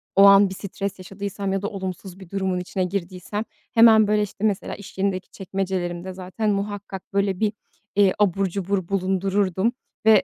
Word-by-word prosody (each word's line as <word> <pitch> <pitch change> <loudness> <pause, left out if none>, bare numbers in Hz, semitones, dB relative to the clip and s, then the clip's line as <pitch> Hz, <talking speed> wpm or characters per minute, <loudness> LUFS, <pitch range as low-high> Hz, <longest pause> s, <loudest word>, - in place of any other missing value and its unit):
o 195 - +7
an 200 0 +8
bir - - -5
stres 200 0 -5
yaşadıysam 195 +1 -4
ya 195 - 0
da 205 - -2
olumsuz 190 -1 -6
bir 190 -3 -12
durumun 190 -2 -1
içine 185 +1 -2
girdiysem 185 +3 -3 0.3
hemen, 225 -2 +7
böyle, 210 0 +3
işte, 210 0 -4
mesela 205 -3 0
iş 200 - -12
yerindeki 190 -1 -1
çekmecelerimde 185 -2 -3
zaten 190 +4 -3
muhakkak 200 -2 -4
böyle 195 -2 +1
bir, 215 -1 +1 0.4
eee, 200 -2 +5
abur 195 -1 +3
cubur 190 0 -2
bulundururdum 195 +2 +1 0.3
ve 215 -4 +7
195 Hz, 165 wpm, -23 LUFS, 185-205 Hz, 0.4 s, an